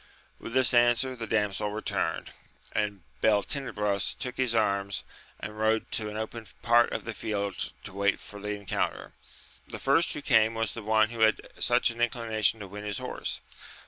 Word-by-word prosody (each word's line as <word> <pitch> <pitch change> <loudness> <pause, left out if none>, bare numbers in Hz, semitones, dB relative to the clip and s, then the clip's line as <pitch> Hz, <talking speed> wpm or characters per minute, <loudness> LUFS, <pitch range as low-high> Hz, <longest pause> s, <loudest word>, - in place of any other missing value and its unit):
With 115 - -7
this 130 -1 +4
answer 120 +2 +4
the 115 -2 -5
damsel 105 -1 0
returned; 110 +1 -2 0.4
and 100 -3 -1 0.2
Beltenebros 105 -2 +1
took 125 0 -5
his 125 -3 +1
arms, 100 -3 +1 0.4
and 105 +1 -7
rode 110 +1 +1
to 105 -1 -1
an 105 - -6
open 110 0 -5 0.2
part 120 +1 +5
of - - -3
the 115 - -4
field 100 -2 -3
to 100 - -8
wait 100 0 +1
for 105 - -10
the 105 0 -2
encounter. 100 -1 -3 0.5
The - - -6
first 145 +5 +3
who 145 - -6
came 110 -4 +4
was 115 -3 -1
the 115 - -6
one 110 +1 +3
who 115 - -7
had 110 -1 +4 0.2
such - - +3
an 120 0 -7
inclination 115 -2 +2
to 100 - -6
win 105 +2 -8
his 105 -2 -2
horse. - - -4
110 Hz, 175 wpm, -29 LUFS, 105-120 Hz, 0.5 s, part